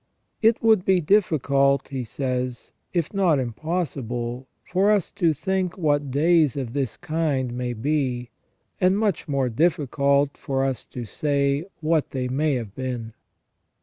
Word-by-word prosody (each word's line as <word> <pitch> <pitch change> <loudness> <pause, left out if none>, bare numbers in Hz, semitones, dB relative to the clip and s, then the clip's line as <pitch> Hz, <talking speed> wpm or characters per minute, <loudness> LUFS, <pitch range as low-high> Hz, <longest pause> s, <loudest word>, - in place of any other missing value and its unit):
"It 225 0 +3
would 220 -5 +5
be 190 -1 +3
difficult," 140 -7 +2
he 135 -2 -3
says, 125 0 -3 0.2
"if 170 -1 -1
not 185 -6 +3
im 125 -3 -2
possible, 130 -6 -3 0.2
for 190 +3 +1
us 205 -4 +2
to 170 -2 +2
think 185 +4 -2
what 145 -4 +1
days 155 0 +3
of 125 -4 -4
this 135 -5 -2
kind 145 -6 -1
may 125 0 -3
be, 125 -1 -1 0.5
and 185 +2 +4
much 210 -5 0
more 135 -3 0
difficult 140 0 +1
for 135 -1 -1
us 135 -2 -3
to 120 -2 -6
say 140 +4 0 0.2
what 155 -1 +1
they 130 -2 -2
may 145 +3 +1
have 115 -6 -5
been." 120 -3 -4
140 Hz, 150 wpm, -24 LUFS, 125-165 Hz, 0.5 s, would